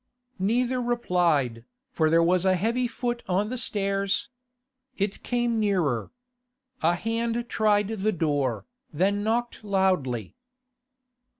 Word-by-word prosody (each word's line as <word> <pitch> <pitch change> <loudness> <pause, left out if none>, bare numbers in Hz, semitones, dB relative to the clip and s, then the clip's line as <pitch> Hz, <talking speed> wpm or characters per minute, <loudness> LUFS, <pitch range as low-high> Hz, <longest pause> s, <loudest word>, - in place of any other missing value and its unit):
Neither 245 +6 +1
replied, 175 - +1 0.3
for 160 -9 +2
there 165 +1 +4
was 180 +1 +3
a 190 -1 +3
heavy 230 +7 0
foot 240 0 -3
on 195 +4 +1
the 255 - -3
stairs. 195 -2 0 0.7
It 200 0 -2
came 240 -2 0
nearer. 175 - 0 0.7
A 170 +2 +3
hand 230 +4 -2
tried 210 -2 +2
the 215 -1 0
door, 145 - -1 0.3
then 195 +6 +1
knocked 235 +1 -1
loudly. 185 - 0
200 Hz, 115 wpm, -26 LUFS, 170-230 Hz, 0.7 s, there